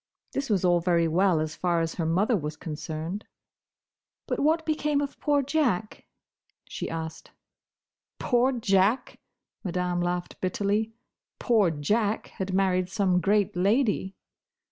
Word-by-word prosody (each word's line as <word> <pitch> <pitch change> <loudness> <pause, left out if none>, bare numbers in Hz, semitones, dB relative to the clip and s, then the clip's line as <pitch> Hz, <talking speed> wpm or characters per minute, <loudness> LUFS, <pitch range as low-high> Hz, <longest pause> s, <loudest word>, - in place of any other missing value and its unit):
This 275 -1 -3
was 195 -4 +2
all 175 -1 +4
very 170 -1 +2
well, 175 +1 +3
as 155 0 -3
far 175 -2 +1
as 165 0 -1
her 165 -3 -2
mother 195 +8 +2
was 150 -4 -3
concerned. 160 +4 -5 1.0
"But - - -2
what 320 +2 +2
became 300 -2 +1
of 285 -1 -4
poor 290 -2 +2
Jack?" 255 - -1 0.6
she - - -5
asked. 160 0 -6 0.9
"Poor 245 +1 +2
Jack!" 215 -1 +1 0.4
Madame 180 -2 -1
laughed 175 0 -3
bitterly. 205 +4 0 0.5
"Poor 220 -7 +3
Jack 205 +8 0
had 190 0 -2
married 185 -1 +1
some 185 -3 +1
great 200 +1 +2
lady!" 200 0 +1
190 Hz, 130 wpm, -27 LUFS, 175-225 Hz, 1.0 s, all